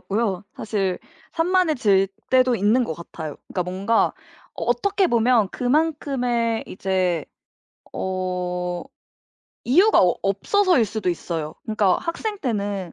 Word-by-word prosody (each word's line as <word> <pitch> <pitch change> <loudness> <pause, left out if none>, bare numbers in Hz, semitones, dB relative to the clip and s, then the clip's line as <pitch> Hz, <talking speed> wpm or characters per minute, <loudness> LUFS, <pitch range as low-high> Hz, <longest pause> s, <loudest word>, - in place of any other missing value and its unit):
같고요. 205 -2 -1
사실 195 -4 -1 0.3
산만해질 310 - +2 0.2
때도 255 -1 +4
있는 225 +4 +3
것 160 - -4
같아요. 160 -2 -8
그러니까 180 - -1
뭔가 195 +5 +1 0.5
어 - - -4
어떻게 385 - +1
보면 235 -4 +3
그만큼의 250 -5 0
이제 185 -4 -1 0.7
어 180 -1 -3 0.8
이유가 365 - +5
어 180 -1 +3
없어서일 290 - +2
수도 210 -2 -3
있어요. 165 -3 -3
그러니까 215 -4 +2
학생 415 +6 -3
때는 200 - -3
215 Hz, 265 characters per minute, -23 LUFS, 185-255 Hz, 0.8 s, 이유가